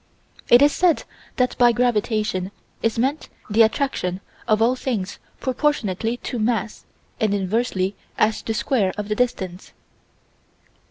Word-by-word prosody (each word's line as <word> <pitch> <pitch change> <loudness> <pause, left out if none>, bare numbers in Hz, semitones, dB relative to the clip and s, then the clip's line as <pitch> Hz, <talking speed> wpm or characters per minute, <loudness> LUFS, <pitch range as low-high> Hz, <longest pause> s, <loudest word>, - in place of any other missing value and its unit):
It 245 +3 +8
is 290 - +6
said 350 -1 +2 0.3
that 250 0 +1
by 240 -1 +7
gravitation 215 -5 0 0.3
is 225 0 0
meant 270 +6 -1 0.2
the 220 +2 +5
attraction 220 -6 +1 0.3
of 215 -2 +3
all 235 +3 +3
things 220 -7 -3 0.2
proportionately 240 -5 0
to 245 - -3
mass 220 -1 -1 0.3
and 210 -2 +2
inversely 195 -1 0 0.2
as 215 +1 +2
the 225 - -3
square 210 -3 +1
of 210 0 -4
the 210 - 0
distance. 190 -7 -2
225 Hz, 130 wpm, -22 LUFS, 205-250 Hz, 0.3 s, It